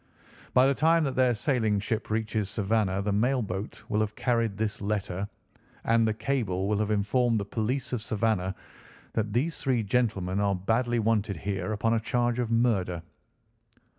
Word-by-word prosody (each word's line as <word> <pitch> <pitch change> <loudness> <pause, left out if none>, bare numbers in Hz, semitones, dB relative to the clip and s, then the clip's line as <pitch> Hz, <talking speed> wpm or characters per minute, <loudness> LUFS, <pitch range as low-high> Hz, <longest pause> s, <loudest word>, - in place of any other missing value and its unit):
By 125 - +7
the 135 - +4
time 160 +4 +3
that 135 -3 -1
their 130 -2 +3
sailing 110 -4 +1
ship 110 +2 -3
reaches 110 -2 -1
Savannah 100 -2 0
the 105 - 0
mail 120 +5 +2
boat 95 +2 -5
will 105 - 0
have 110 0 -1
carried 115 -4 0
this 110 -1 -2
letter, 100 -1 -2 0.5
and 115 0 +3
the 110 - +1
cable 110 -6 -1
will 105 0 +1
have 105 -1 0
informed 110 +3 +2
the 100 - -3
police 120 +6 -2
of 120 - -1
Savannah 105 -4 0 0.6
that 110 -2 -1
these 150 +8 0
three 125 -5 +1
gentlemen 100 -4 0
are 100 -1 +2
badly 115 +6 0
wanted 110 -3 +1
here 95 +2 -3
upon 115 +2 +1
a 115 - +2
charge 120 +1 0
of 120 -2 -1
murder." 105 -8 +1
110 Hz, 170 wpm, -28 LUFS, 100-120 Hz, 0.6 s, By